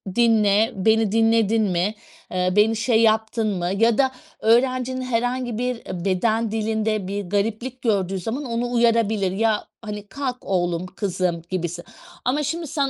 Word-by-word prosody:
dinle, 220 -1 +3
beni 220 +1 +2
dinledin 225 -1 +3
mi, 190 +2 0 0.4
eee, 180 0 0
beni 215 +2 +4
şey 225 0 +2
yaptın 220 0 +2
mı?" 175 +1 -1
ya 230 0 +3
da 265 -1 +3 0.3
öğrencinin 255 +2 +2
herhangi 245 -1 -1
bir 250 0 -1 0.3
beden 220 +4 +1
dilinde 220 -2 -1
bir 200 +1 -3
gariplik 225 +5 -2
gördüğü 195 -4 0
zaman 225 +10 -4
onu 240 0 -2
uyarabilir, 225 -5 +2
"ya 215 +2 0 0.2
hani 210 -1 -7
kalk 260 0 -4
oğlum 175 -2 0
kızım 185 -3 -2
gibisin" 175 -1 -3 0.4
ama 285 +5 +1
şimdi 330 +2 -3
sen 280 -2 0
220 Hz, 145 wpm, -22 LUFS, 200-240 Hz, 0.4 s, beni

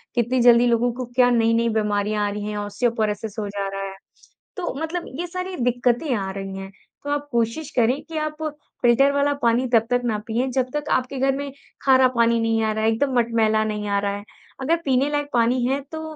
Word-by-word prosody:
कितनी 240 +2 +1
जल्दी 240 0 +6
लोगों 240 +1 +2
को 255 0 -5
क्या 250 -1 +5
नई-नई 230 0 +2
बीमारियाँ 210 0 0
आ - - -1
रही 205 0 -5
हैं, 210 - -4
ऑस्टियोपोरोसिस 215 0 -2
हो 210 - -2
जा 200 -1 -3
रहा 195 0 -5
है। 195 - -12 0.6
तो 365 - -3
मतलब 335 +2 -3
ये 350 - -1
सारी 365 +1 -5
दिक्कतें 245 +3 +1
आ 195 -2 -3
रही 195 0 -6
हैं, 195 0 -7 0.3
तो 285 - -5
आप 290 0 -2
कोशिश 235 +6 -1
करें 245 +3 +2
कि 325 -1 -6
आप 305 0 -3 0.4
फिल्टर 250 +3 +4
वाला 285 0 +2
पानी 240 +2 +2
तब 225 -1 +5
तक 245 0 +2
ना 220 -3 0
पिएँ, 235 +3 0
जब 255 0 0
तक 295 0 -3
आपके 255 +1 0
घर 270 0 +2
में 280 0 -4 0.3
खारा 260 -1 +6
पानी 235 0 +3
नहीं 225 0 +1
आ 220 - +1
रहा 220 - -2
है, 220 - +4
एकदम 265 +4 0
मटमैला 225 -2 +2
नहीं 210 -1 -3
आ 200 0 +2
रहा 200 0 -1
है। 205 - -9 0.4
अगर 320 +6 +2
पीने 270 +1 +2
लायक 290 0 -1
पानी 240 +1 +2
है 270 +2 +1
तो 315 0 -5
240 Hz, 220 wpm, -23 LUFS, 215-270 Hz, 0.6 s, जल्दी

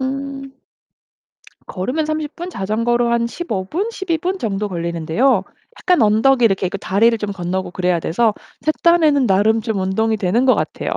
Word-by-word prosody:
음. 275 +1 -4 1.1
걸으면 255 +12 -2
30 310 0 -3
분, 350 +1 -6
자전거로 235 - 0
한 235 0 +1
15 230 - -4
분, 365 - -2
12 380 -7 -2
분 370 +4 -2
정도 210 - -2
걸리는데요. 170 +6 0 0.3
약간 360 -8 +2
언덕이 235 +4 +3
이렇게 195 -3 +2
있고 190 +2 -4
다리를 225 +5 +2
좀 210 -1 -3
건너고 185 0 -3
그래야 180 -1 0
돼서 215 +7 +1 0.3
제 310 - +1
딴에는 310 -6 +4
나름 215 +3 +3
좀 220 -2 -3
운동이 220 +4 0
되는 205 +5 +1
것 255 - +5
같아요. - - -3
230 Hz, 310 characters per minute, -19 LUFS, 195-275 Hz, 1.1 s, 것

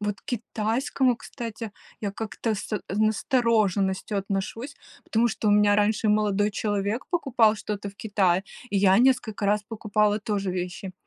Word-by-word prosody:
Вот 205 -1 -3
к - - -44
китайскому, 240 +2 0
кстати, 230 -2 -7 0.3
я 205 -2 -2
как-то 220 +1 -3
с 210 0 -4
настороженностью 215 -2 +1
отношусь, 205 +7 -4 0.3
потому 230 +2 +2
что 220 -1 -1
у - - +5
меня 205 0 +5
раньше 215 +1 +2
молодой 210 -1 +2
человек 205 +2 -2
покупал 250 -10 +3
что-то 210 -1 -5
в 200 - -12
Китае, 195 -4 +1 0.3
и 205 - 0
я 195 0 +5
несколько 245 -5 +2
раз 210 +1 +2
покупала 210 -1 0
тоже 200 -2 -2
вещи. 180 +1 -4
210 Hz, 145 wpm, -26 LUFS, 200-225 Hz, 0.3 s, у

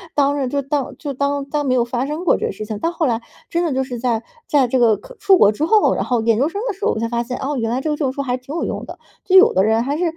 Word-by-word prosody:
当 280 -2 +1
就 280 +1 -1
当 280 0 -3
就 285 -2 -5
当 280 +1 -1
当 290 +1 -2
没 255 -1 +2
有 240 -1 +2
发 245 +2 -2
生 310 +5 -4
过 - - +4
这 - - -2
个 - - -3
事 215 +2 -7
情。” 210 -1 -5
到 330 - 0
后 340 -2 -1
来， 235 -3 0 0.3
真 340 +1 0
的 330 - 0
就 265 0 0
是 245 -3 -6
在 235 -2 -1 0.2
在 280 -4 +3
这 255 +2 +1
个 225 -3 +4
可 - - -14
出 395 -2 +5
国 205 - +5
之 215 +8 -4
后， 430 +4 +4
然 - - -1
后 245 -3 0
研 225 -1 +2
究 285 +5 +2
生 400 - -5
的 445 - -1
时 405 +3 -13
候 - - +3
我 220 - -3
才 230 - -1
发 235 0 -1
现： 250 +1 -5
“哦， 285 +2 -3
原 225 -2 -1
来 245 +3 -1
这 310 - -2
个 - - 0
证 280 -4 -1
书 280 +1 -4
还 250 -2 -1
挺 255 +3 -9
有 335 - -1
用 - - -4
的， - - -9 0.3
就 380 0 +5
有 375 - +7
的 190 - +3
人 220 +2 +2
还 280 +3 -2
是 335 - -2
270 Hz, 360 characters per minute, -19 LUFS, 240-300 Hz, 0.3 s, 有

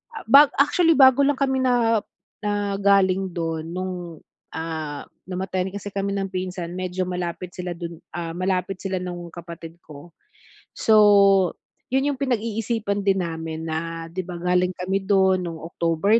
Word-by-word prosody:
ah, - - -7
ba 285 +2 +9 0.2
actually 330 +3 +4
bago 265 -1 +7
lang 285 +1 +2
kami 265 -1 +1
na 230 -3 +3 0.5
na 205 -1 -1
galing 195 -1 +3
dun 165 -2 -3
nung, 185 0 -3 0.6
ah, 160 -3 -4 0.2
namatayan 185 0 -2
kasi 205 0 -6
kami 200 0 -1
ng 195 -1 -2
pinsan 185 -2 -4
medyo 185 0 -2
malapit 180 0 -4
sila 180 -1 -4
dun, 170 -1 -7 0.2
ah, 170 -1 -4
malapit 185 0 -1
sila 190 -1 -2
nung 175 -1 -6
kapatid 170 -1 -9
ko. 150 +3 -13 0.6
So, 200 -3 +5 0.4
yun 265 +1 +2
yung 270 - -6
pinag-iisipan 225 -4 -1
din 195 -1 +3
namin 160 -1 -5
na, 165 +1 -4
'di 180 - -6
ba, 180 - -6
galing 180 +1 +1
kami 190 +2 -2
do'n 190 -2 +4
no'ng 165 -2 -5
October 170 +7 +2
185 Hz, 150 wpm, -23 LUFS, 170-205 Hz, 0.6 s, ba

